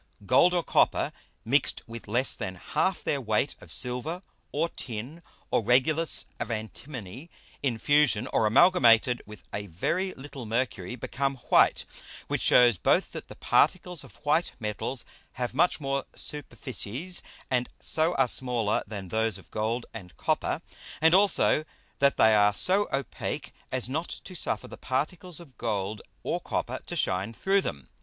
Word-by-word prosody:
Gold, 175 - +5
or 175 - +2
Copper - - +2 0.3
mix'd 140 +6 +1
with 115 -1 -9
less 120 +6 +2
than 95 -5 -5
half 185 - -1
their 140 - 0
Weight 110 +4 0
of - - -13
Silver, 135 +9 -2 0.3
or 160 +4 0
Tin, 125 +7 -7 0.3
or - - +3
Regulus 150 +8 +2
of - - -3
Antimony, 115 - -6 0.3
in 125 -5 0
fusion, 145 -3 +3
or 110 - +3
amalgamed 120 -4 +5
with 105 -1 -11
a 100 0 -4
very 175 - -1
little 135 -3 -8
Mercury, 115 -3 -2
become 135 +3 -2
white; - - +5 0.4
which - - -1
shews 120 -6 +6
both - - +2
that - - -7
the - - -10
Particles 180 -2 +2
of - - -15
white 155 +4 +2
Metals 110 +3 -3 0.3
have 125 -1 -3
much 165 +6 +3
more 135 -1 -1
Superficies, 145 - -4 0.3
and 125 -1 +1
so 160 +2 +1
are 135 -1 +3
smaller, 120 -4 0
than 100 -3 -7
those 110 -1 0
of 95 - -17
Gold 115 +3 -1
and 90 -6 -10
Copper, - - -1 0.4
and 160 +2 +5
also 195 -5 +5 0.4
that 140 0 +4
they 110 0 +6
are 105 -1 +5
so 195 - +3
opake 135 0 -3 0.2
as 130 -2 0
not 155 +6 -2 0.2
to 185 - -9
suffer 175 - -3
the - - -10
Particles 165 +7 -3
of 150 -7 -15
Gold 105 -2 -2 0.2
or - - -1
Copper - - -3
to - - -4
shine 95 +5 0
through 195 - +2
them. 70 - -5
125 Hz, 155 wpm, -28 LUFS, 110-155 Hz, 0.4 s, shews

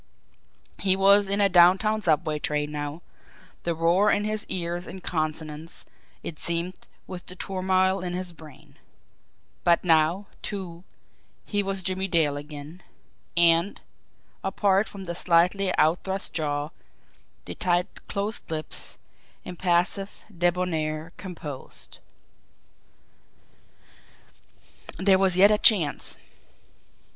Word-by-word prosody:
He 190 -1 +3
was 200 +1 +5
in 200 +1 +1
a 200 - +5
downtown 190 +4 +5
subway 155 -3 +1
train 150 0 -1
now 150 +2 -5 0.6
the 170 -1 -1
roar 170 +6 +3
in 205 - +2
his 215 0 -2
ears 175 -1 -2
in 190 - -8
consonance, 155 -1 -3 0.4
it 155 - -7
seemed, 170 +2 -3 0.2
with 180 -1 -8
the 180 - -8
turmoil 190 0 +1
in 175 -1 -3
his 180 -1 -4
brain. 155 -4 -15 0.9
But 170 -1 +3
now, 165 +3 +3 0.2
too, 180 -4 -6 0.6
he 205 -1 0
was 195 -1 -3
Jimmie 190 +1 -1
Dale 160 -5 +2
again; 150 +4 -9 0.6
and, 170 +3 +4 0.6
apart 195 +1 +2
from 195 -1 -9
the 170 -2 -4
slightly 180 +3 +2
outthrust 190 +5 +1
jaw, 145 -2 -1 0.8
the - - -5
tight 175 0 -1
closed 205 +2 -3
lips, 155 -1 -3 0.5
impassive, 180 +2 -1
debonair, 170 -2 -1
composed. 160 -8 -8 3.0
There 190 +1 +4
was 190 -2 +2
yet 200 +3 +7
a 210 - +3
chance. 190 - +4
180 Hz, 110 wpm, -26 LUFS, 160-195 Hz, 3.0 s, yet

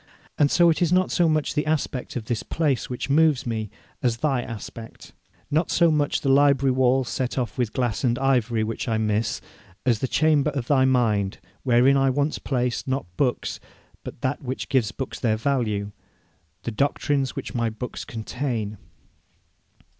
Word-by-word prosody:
And 145 - +5
so 170 +1 +5
it 165 - -2
is 175 -2 +2
not 185 0 +3
so 170 -2 +3
much 155 -1 0
the 150 - -1
aspect 150 -4 -2
of 120 -4 -4
this 115 -1 -2
place 145 -7 -1
which 125 - -4
moves 150 -1 +3
me, 110 -3 -3 0.3
as 120 -2 +1
thy 135 -2 +1
aspect; 115 -1 -9 0.4
not 155 +4 +1
so 170 -1 +4
much 145 -2 +1
the - - -3
library 140 -1 +4
walls 130 0 +2
set 130 +1 -2
off 120 -4 -2
with 120 -4 -1
glass 120 -3 -1
and 120 -2 +2
ivory 125 -4 +1
which 115 +3 -4
I 110 - +1
miss, 110 +1 0 0.4
as 120 -4 +2
the 130 - -1
chamber 150 0 +3
of 130 -4 -2
thy 130 -1 +3
mind, 110 -7 +1 0.2
wherein 130 +2 +4
I 135 0 +3
once 145 +3 0
placed, 125 -2 -1
not 130 -10 -3
books, 130 -4 -1 0.4
but - - -9
that 130 +1 -1
which 130 -1 -5
gives 125 -6 +2
books 130 +5 -6
their 110 -3 +1
value, 110 -5 -1 0.7
the 120 - -3
doctrines 140 +2 0
which - - -5
my 115 -3 0
books 115 +3 -6
contain. 110 -2 -4
130 Hz, 175 wpm, -24 LUFS, 115-140 Hz, 0.7 s, And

